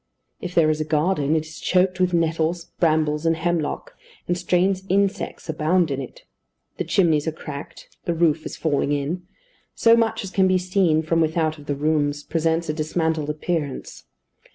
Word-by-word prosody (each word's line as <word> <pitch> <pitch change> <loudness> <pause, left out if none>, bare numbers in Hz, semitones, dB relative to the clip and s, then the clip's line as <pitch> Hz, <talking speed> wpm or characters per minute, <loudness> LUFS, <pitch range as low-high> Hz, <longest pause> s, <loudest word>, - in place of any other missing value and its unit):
If 180 0 -6
there 155 -2 +5
is 155 0 -2
a - - +2
garden, 155 0 +1
it 155 -1 0
is 155 0 -11
choked 185 0 +2
with 180 -1 +2
nettles, 165 0 0
brambles, 155 -2 +2
and 165 0 +2
hemlock, 175 - -2 0.3
and 175 - +1
strange 180 +2 +1
insects 200 +1 0
abound 160 +1 +1
in 135 0 -2
it. 130 - -10 0.5
The - - -1
chimneys 160 -5 +2
are - - +1
cracked, 145 -2 -9 0.2
the 170 - 0
roof 160 -2 +2
is - - -7
falling 145 -2 0
in; 160 +5 -3 0.5
so 230 0 +5
much 230 -2 +1
as 195 - -7
can 190 -1 +3
be 185 0 +3
seen 180 -3 +2
from 165 +1 +1
without 160 -1 0
of 145 - -14
the 145 - -1
rooms 145 0 0
presents 165 0 0
a 155 - -1
dismantled 160 -1 -1
appearance. 150 -2 -3
160 Hz, 175 wpm, -23 LUFS, 155-180 Hz, 0.5 s, there